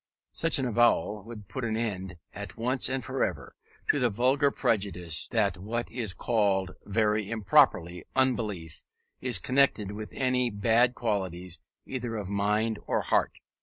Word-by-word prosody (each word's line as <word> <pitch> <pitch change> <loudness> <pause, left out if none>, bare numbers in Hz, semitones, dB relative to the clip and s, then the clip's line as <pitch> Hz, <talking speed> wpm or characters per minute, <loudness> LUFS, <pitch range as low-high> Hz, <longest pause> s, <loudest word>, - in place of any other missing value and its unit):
Such 165 -1 +3
an 135 - 0
avowal 110 -4 +2
would 110 -4 -9
put 130 - -5
an 110 -1 -1
end, 95 -6 -3 0.2
at - - -8
once 125 +3 0
and 130 -3 -2
for - - -1
ever, - - -3 0.4
to 145 - -1
the 125 -2 +3
vulgar 130 +6 +3
prejudice, 90 - -1
that 105 -7 +1
what 115 +5 -3
is 110 -7 -2
called, 100 -4 +1 0.2
very 105 0 +1
improperly, 90 -5 +3
unbelief, 110 -11 0 0.4
is 125 -5 +1
connected 130 -2 +2
with 105 +1 -6
any 125 -2 +1
bad 115 +4 +3
qualities 90 -6 -3 0.3
either 120 -3 -4
of 100 -3 -4
mind 105 +2 +1
or - - +1
heart. - - +1
110 Hz, 150 wpm, -28 LUFS, 100-120 Hz, 0.4 s, Such